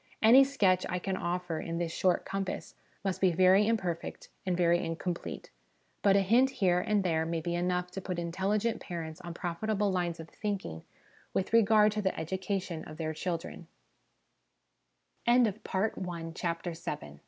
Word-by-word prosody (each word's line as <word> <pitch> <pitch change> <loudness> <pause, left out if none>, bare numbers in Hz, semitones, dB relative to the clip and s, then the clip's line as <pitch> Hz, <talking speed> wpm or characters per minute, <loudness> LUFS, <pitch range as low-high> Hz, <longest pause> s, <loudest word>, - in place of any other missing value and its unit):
Any 240 +5 +8
sketch 200 -10 +2
I 180 - -1
can 190 +1 -2
offer 175 -2 -2
in 165 +1 -4
this 170 -1 -2
short 180 +1 +1
compass 195 -1 -4 0.3
must 195 -2 -2
be 185 -3 +4
very 185 +4 +5
imperfect 185 -7 -2 0.2
and 180 -1 +1
very 175 -1 +3
incomplete; 170 +1 -4 0.5
but 195 -1 +5
a 200 - +5
hint 235 +7 +4
here 190 -9 +2
and 205 +1 +1
there 160 -3 +1
may 165 0 -2
be 170 +2 -3
enough 180 +1 -1
to 195 - -5
put 185 -1 -4
intelligent 195 +6 -1
parents 165 -2 -6
on 175 -2 -7
profitable 205 +4 -1
lines 175 -2 -1
of 160 - -8
thinking 195 - -4 0.5
with 190 - -1
regard 215 -1 +6
to 210 0 -2
the 190 - +2
edu 175 +4 -4
cation 185 -4 -3
of 155 - -10
their 160 -1 -2
185 Hz, 145 wpm, -30 LUFS, 170-200 Hz, 0.5 s, Any